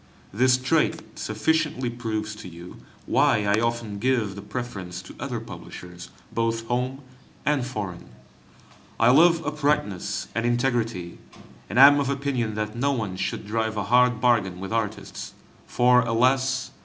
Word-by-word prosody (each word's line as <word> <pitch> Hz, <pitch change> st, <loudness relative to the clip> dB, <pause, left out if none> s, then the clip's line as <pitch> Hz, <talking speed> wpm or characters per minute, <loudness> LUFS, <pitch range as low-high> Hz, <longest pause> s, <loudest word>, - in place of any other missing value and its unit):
This 125 Hz, +4 st, +4 dB
trait 150 Hz, +5 st, +1 dB, 0.2 s
sufficiently 130 Hz, +2 st, 0 dB
proves 110 Hz, -3 st, -3 dB
to 105 Hz, -, -9 dB
you 85 Hz, +1 st, -11 dB, 0.3 s
why 105 Hz, -, +3 dB
I 100 Hz, +1 st, +3 dB
often 115 Hz, -3 st, -2 dB
give 120 Hz, -4 st, +1 dB
the 100 Hz, -, -8 dB
preference 100 Hz, -7 st, -6 dB
to -, -, -11 dB
other -, -, -3 dB
publishers 90 Hz, 0 st, -10 dB, 0.2 s
both 115 Hz, 0 st, -1 dB
home 125 Hz, +3 st, -2 dB, 0.4 s
and 145 Hz, -3 st, +2 dB
foreign. 105 Hz, -8 st, -6 dB, 0.9 s
I 115 Hz, +2 st, +6 dB
love 165 Hz, +3 st, +5 dB
uprightness 145 Hz, -11 st, -1 dB
and 115 Hz, -, -1 dB
integrity, 120 Hz, -7 st, -1 dB, 0.5 s
and 105 Hz, -, -3 dB
am 145 Hz, +2 st, +9 dB
of 140 Hz, -1 st, 0 dB
opinion 135 Hz, -6 st, -1 dB
that 105 Hz, 0 st, -3 dB
no 140 Hz, +4 st, +1 dB
one 110 Hz, -8 st, -2 dB
should 95 Hz, -, -3 dB
drive 110 Hz, +1 st, -2 dB
a 105 Hz, -, 0 dB
hard 125 Hz, -1 st, +5 dB
bargain 110 Hz, -7 st, +2 dB
with 95 Hz, +3 st, -5 dB
artists, 105 Hz, -4 st, -4 dB, 0.3 s
for, 125 Hz, 0 st, +4 dB
alas! 130 Hz, +2 st, +1 dB
115 Hz, 145 wpm, -25 LUFS, 105-130 Hz, 0.9 s, am